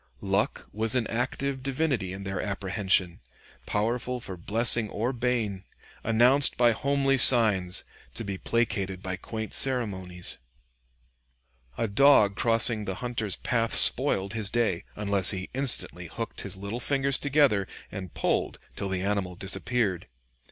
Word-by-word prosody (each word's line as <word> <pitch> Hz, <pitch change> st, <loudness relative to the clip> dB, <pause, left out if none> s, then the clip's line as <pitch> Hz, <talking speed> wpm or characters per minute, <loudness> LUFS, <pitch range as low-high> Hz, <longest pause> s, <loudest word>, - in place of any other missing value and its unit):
Luck 100 Hz, +1 st, -2 dB
was 110 Hz, +3 st, 0 dB
an 125 Hz, -3 st, +1 dB
active 130 Hz, +4 st, -3 dB
divinity 135 Hz, -, -2 dB
in 95 Hz, +1 st, -7 dB
their 95 Hz, -1 st, -4 dB
apprehension, 95 Hz, -3 st, -1 dB, 0.5 s
powerful 120 Hz, +4 st, -2 dB
for 95 Hz, -5 st, -7 dB
blessing 110 Hz, +4 st, +1 dB
or 115 Hz, +6 st, -2 dB
bane, 115 Hz, -6 st, -2 dB, 0.4 s
announced 125 Hz, +5 st, +5 dB
by 120 Hz, -1 st, +4 dB
homely 135 Hz, +2 st, 0 dB
signs, 105 Hz, -8 st, +4 dB, 0.3 s
to -, -, -3 dB
be 100 Hz, -3 st, -5 dB
placated 100 Hz, -5 st, -2 dB
by 95 Hz, 0 st, -3 dB
quaint 110 Hz, +3 st, -7 dB
ceremonies. 95 Hz, -9 st, -2 dB, 1.4 s
A 115 Hz, -, -1 dB
dog 105 Hz, -2 st, +4 dB
crossing 115 Hz, -1 st, +3 dB
the 95 Hz, -, -4 dB
hunter's 115 Hz, -4 st, -2 dB
path 115 Hz, -3 st, -1 dB
spoiled 95 Hz, 0 st, +4 dB
his 110 Hz, -3 st, -2 dB
day, 110 Hz, -6 st, -1 dB
unless 100 Hz, -2 st, +1 dB
he 95 Hz, -2 st, -3 dB
instantly 135 Hz, 0 st, +3 dB
hooked -, -, -6 dB
his -, -, -7 dB
little 100 Hz, +5 st, -6 dB
fingers 135 Hz, +1 st, +1 dB
together, 140 Hz, -9 st, +2 dB, 0.2 s
and 95 Hz, -3 st, -8 dB
pulled -, -, -1 dB, 0.2 s
till 100 Hz, -, -4 dB
the 95 Hz, -1 st, -2 dB
animal 100 Hz, -3 st, -2 dB
disappeared. 95 Hz, +1 st, -2 dB
110 Hz, 135 wpm, -26 LUFS, 95-125 Hz, 1.4 s, announced